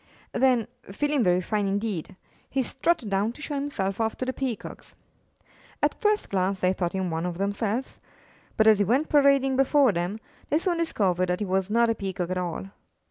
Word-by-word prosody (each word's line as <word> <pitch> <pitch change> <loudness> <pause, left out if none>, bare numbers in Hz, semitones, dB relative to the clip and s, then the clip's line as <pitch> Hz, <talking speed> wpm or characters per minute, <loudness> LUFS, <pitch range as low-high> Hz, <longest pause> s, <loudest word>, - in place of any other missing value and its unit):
Then, 250 -4 +2 0.2
feeling 290 +4 +1
very 180 -1 +3
fine 205 +2 -1
indeed, 200 -4 -2 0.3
he 265 -1 0
strutted 265 -3 -1
down 200 +4 +1
to 300 - -13
show 300 - -4
himself 230 -9 -2
off 220 0 -1
to 255 - -2
the 260 - -2
Peacocks. 255 -5 -5 0.9
At - - +3
first 420 -1 +1
glance 190 0 0
they 185 0 +2
thought 175 -2 -2
him 190 -2 -2
one 160 0 -2
of 175 -1 -4
themselves, 205 +5 -2 0.6
but, 220 - +4
as 215 -2 +6
he - - +4
went 255 - +1
parading 275 -2 +4
before 270 -1 +4
them, 180 +4 -2 0.3
they 300 - +3
soon 345 +1 -1
discovered 185 - 0
that 180 - 0
he 210 - -1
was 190 0 0
not 235 +2 +3
a - - +2
Peacock 185 -4 -4
at 185 - -1
all. 180 +2 -4
215 Hz, 190 wpm, -26 LUFS, 190-265 Hz, 0.9 s, as